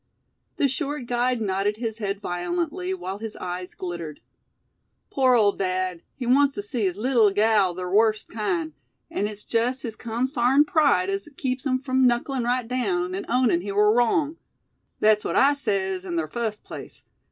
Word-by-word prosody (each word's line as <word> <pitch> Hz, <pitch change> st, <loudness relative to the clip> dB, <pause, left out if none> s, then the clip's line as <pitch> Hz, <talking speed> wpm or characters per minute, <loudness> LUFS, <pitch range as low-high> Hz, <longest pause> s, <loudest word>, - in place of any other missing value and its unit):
The 285 Hz, -, +3 dB
short 285 Hz, 0 st, -3 dB
guide 245 Hz, +1 st, 0 dB
nodded 200 Hz, +1 st, 0 dB
his 225 Hz, -1 st, -4 dB
head 200 Hz, -2 st, -2 dB
violently, 340 Hz, -, -2 dB
while 205 Hz, -, -4 dB
his 220 Hz, -1 st, -6 dB
eyes 180 Hz, 0 st, -6 dB
glittered. 170 Hz, -4 st, -6 dB, 0.9 s
"Pore 260 Hz, -2 st, +4 dB
ole 210 Hz, -3 st, +5 dB
dad, 185 Hz, -2 st, -2 dB
he 255 Hz, -, -5 dB
wants 275 Hz, +3 st, +4 dB
tew 205 Hz, -, -4 dB
see 210 Hz, +1 st, -2 dB
his 185 Hz, 0 st, -1 dB
leetle 230 Hz, -2 st, +4 dB
gal 205 Hz, -3 st, +3 dB
ther 180 Hz, 0 st, -4 dB
wust 215 Hz, +3 st, +2 dB
kind, 180 Hz, -8 st, -2 dB, 0.4 s
an' 205 Hz, -, -1 dB
it's 210 Hz, 0 st, -7 dB
jest 245 Hz, +3 st, 0 dB
his 225 Hz, -4 st, -5 dB
consarned 250 Hz, +4 st, +2 dB
pride 315 Hz, +5 st, +3 dB
as 395 Hz, -5 st, -4 dB
keeps 260 Hz, +1 st, -2 dB
him 255 Hz, -1 st, +2 dB
frum 260 Hz, -1 st, +2 dB
knucklin' 245 Hz, +1 st, 0 dB
right 245 Hz, 0 st, 0 dB
down, 190 Hz, -8 st, -1 dB
an' 195 Hz, -, -4 dB
ownin' 240 Hz, -8 st, +3 dB
he 200 Hz, +2 st, -5 dB
war 210 Hz, +1 st, +4 dB
wrong. 285 Hz, +7 st, +2 dB, 0.6 s
Thet's 215 Hz, 0 st, +4 dB
what -, -, -2 dB
I 280 Hz, +2 st, +5 dB
sez 195 Hz, -8 st, -1 dB
in 175 Hz, -3 st, -4 dB
ther 160 Hz, -1 st, -1 dB
fust 220 Hz, +4 st, -4 dB
place. -, -, -10 dB
225 Hz, 175 wpm, -25 LUFS, 195-255 Hz, 0.9 s, ole